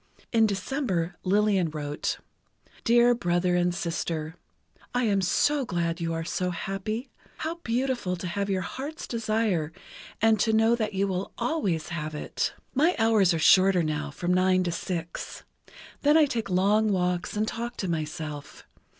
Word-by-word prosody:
In 225 -2 +4
December, 195 - -2
Lillian 195 -2 +2
wrote: 150 -1 -3 0.7
Dear 240 +1 +5
Brother 175 -5 +1
and 175 0 +2
Sister: 165 -2 -3 0.6
I 250 - +2
am 200 -4 +2
so 280 +10 +2
glad 170 -5 -2
you 165 0 -1
are 165 0 -2
so 180 +2 -2
happy. 195 +7 -4 0.3
How 330 +2 -4
beautiful 240 -5 -1
to 180 - -7
have 200 +3 -2
your 190 -1 0
heart's 285 - -6
desire, 215 -8 0 0.5
and 220 -1 +4
to 220 - +2
know 225 +1 +4
that 215 -4 -2
you 195 +1 +1
will 185 0 -3
always 220 - -1
have 155 -2 -4
it.... - - -2 0.2
My 315 +7 +3
hours 220 -5 +4
are 165 - +1
shorter, 185 +2 +5
now, 155 -1 -2
from 175 +5 -1
nine 185 0 +3
to 175 - -1
six. 170 0 -5 0.6
Then 295 +2 +5
I 315 - +6
take 230 -7 -3
long 205 +4 +3
walks 180 0 -1
and 215 +1 +1
talk 235 +2 -4
to 190 - -2
myself. 155 -3 -5
190 Hz, 160 wpm, -27 LUFS, 170-225 Hz, 0.7 s, I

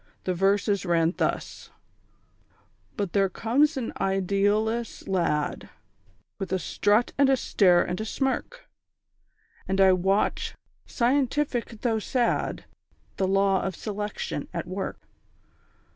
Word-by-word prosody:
The 185 - -1
verses 200 +2 +1
ran 170 -2 +2
thus: - - -2 1.3
_"But 200 -4 -3
there 195 -1 +3
comes 275 - +1
an 245 -3 -3
idealless 205 +4 0
lad, 170 -6 -1 0.7
With 195 -2 -4
a 190 - +2
strut, 205 +5 +1
and 280 -1 +5
a 270 - +4
stare, 180 -7 +4
and 180 +3 -3
a - - -3
smirk; 270 - -3 1.0
And 190 0 -1
I 190 -1 +6
watch, 190 +3 0 0.3
scientific 250 -2 0
though 225 -3 +1
sad, 240 +2 -1 0.5
The 190 - +1
Law 195 0 +2
of 190 -2 -3
Selection 210 +1 -4
at - - -2
work. - - -5
200 Hz, 115 wpm, -26 LUFS, 190-235 Hz, 1.3 s, I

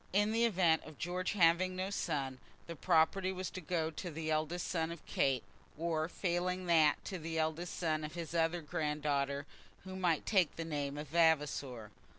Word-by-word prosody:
In 205 +2 +3
the 230 +1 +3
event 175 -7 +3
of 155 -2 -12
George 180 +2 -2
having 185 0 +4
no 185 +2 -2
son, 140 -9 -2 0.3
the 170 - -7
property 180 +3 +2
was 185 0 -4
to 185 - -6
go 160 -1 -1
to 175 +3 -5
the 160 0 -3
eldest 155 +3 -1
son 165 -2 -1
of 170 - -9
Kate, 135 -3 +1 0.3
or 160 0 -1
failing 180 0 -1
that 160 -3 +4
to 190 -3 -4
the 165 0 -4
eldest 160 +2 -1
son 155 -3 0
of 150 +2 -6
his 170 -1 -5
other 165 +1 +1
granddaughter 145 -2 -1 0.4
who 190 0 -7
might 175 -4 +1
take 185 -7 +2
the 165 - -4
name 145 -3 -3
of 150 -1 -6
Vavasor. 145 -8 +1
165 Hz, 180 wpm, -34 LUFS, 155-180 Hz, 0.4 s, having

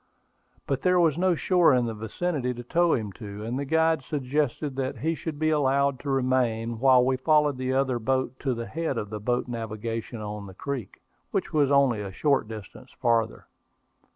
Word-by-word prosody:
But 135 -1 -1
there 180 -1 +3
was 165 -4 +4
no 180 +1 +2
shore 175 -4 +4
in 125 -1 +2
the 115 - -3
vicinity 125 +4 -2
to 120 - -7
tow 170 +7 +2
him 110 -4 -3
to; 105 0 -7
and 120 +4 -2
the 140 - -2
guide 160 +1 +2
suggested 145 0 -2
that 130 -1 -2
he 160 +8 0
should 160 -2 -5
be 155 +1 +1
allowed 140 -2 +2
to 145 - -6
remain, 125 -4 0
while 130 -1 +5
we 130 0 +1
followed 150 0 +3
the 130 0 -1
other 130 -2 +1
boat 130 +1 -1
to 130 -3 -1
the 115 0 -4
head 155 +3 -3
of 105 -2 -4
boat 120 +2 0
navigation 115 0 -4
on 105 -1 -6
the 95 - -12
creek, 130 -4 -6 0.3
which - - -2
was 145 -3 +3
only 135 -6 +3
a 100 -2 -5
short 140 +3 +1
distance 105 -4 -10
farther. 115 -1 +1
130 Hz, 190 wpm, -26 LUFS, 115-145 Hz, 0.3 s, while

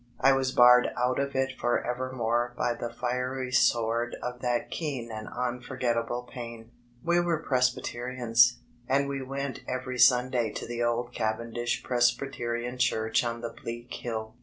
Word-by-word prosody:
I 135 - +6
was 135 -1 +1
barred 125 0 +7
out 125 +1 +1
of 140 0 -2
it 135 0 +1
forevermore 120 -1 -1
by 120 - +1
the 120 0 -5
fiery 125 +2 -2
sword 120 -1 +2
of 125 0 -4
that 120 -1 -1
keen 135 -8 -3
and 110 0 -6
unforgettable 125 -1 -2
pain. 115 -2 -9 0.3
We 170 +1 +3
were 170 -2 0
Presbyterians, 125 -2 +2 0.3
and 140 +1 +2 0.2
went 140 0 -3
every 125 0 -3
Sunday 125 -2 +4
to - - -5
the 120 0 -4
old 120 +1 -1
Cavendish 115 +2 -2
Presbyterian 120 -1 0
Church 110 -2 +2
on 115 -1 -3
the 115 - -3
bleak 120 +1 -7
hill. 110 -2 -4
120 Hz, 140 wpm, -28 LUFS, 120-130 Hz, 0.3 s, barred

